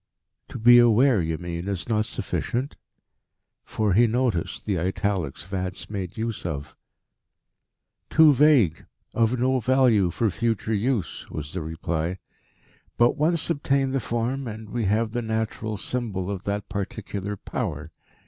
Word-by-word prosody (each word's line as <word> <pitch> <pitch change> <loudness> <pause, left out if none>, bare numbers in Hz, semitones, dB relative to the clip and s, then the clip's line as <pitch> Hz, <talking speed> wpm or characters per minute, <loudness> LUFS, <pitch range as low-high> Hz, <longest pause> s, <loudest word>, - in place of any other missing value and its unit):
"To - - -6
be 120 +1 +7
aware, 120 -1 +5
you 80 -1 -2
mean, 85 +1 -5
is 100 -4 -3
not 110 -2 +1
sufficient?" 130 +4 -3 0.9
For 105 -3 0
he 115 +5 +5
noticed 115 -6 -1
the 100 -5 0
italics 95 -3 -2
Vance 95 +1 -5
made 95 -2 -5
use 115 -1 -3
of. 70 -5 -5 1.3
"Too 155 -2 +6
vague, 130 - +4 0.3
of 115 +2 +2
no 130 +2 +2
value 120 -6 +3
for 110 +5 0
future 115 0 -1
use," 110 0 -1
was 75 -1 -6
the 90 - -3
reply. 80 +2 -3 0.8
"But 120 +1 +4
once 160 +2 +1
obtain 140 -3 +1
the 135 - 0
form, 120 +3 -2
and 110 -1 -8
we 120 -3 -1
have 110 +3 +1
the 120 +1 -2
natural 110 -1 -3
symbol 100 -6 -2
of 100 +1 -6
that 100 0 -2
particular 100 0 -4
Power. 75 -2 -4
110 Hz, 140 wpm, -25 LUFS, 95-120 Hz, 1.3 s, be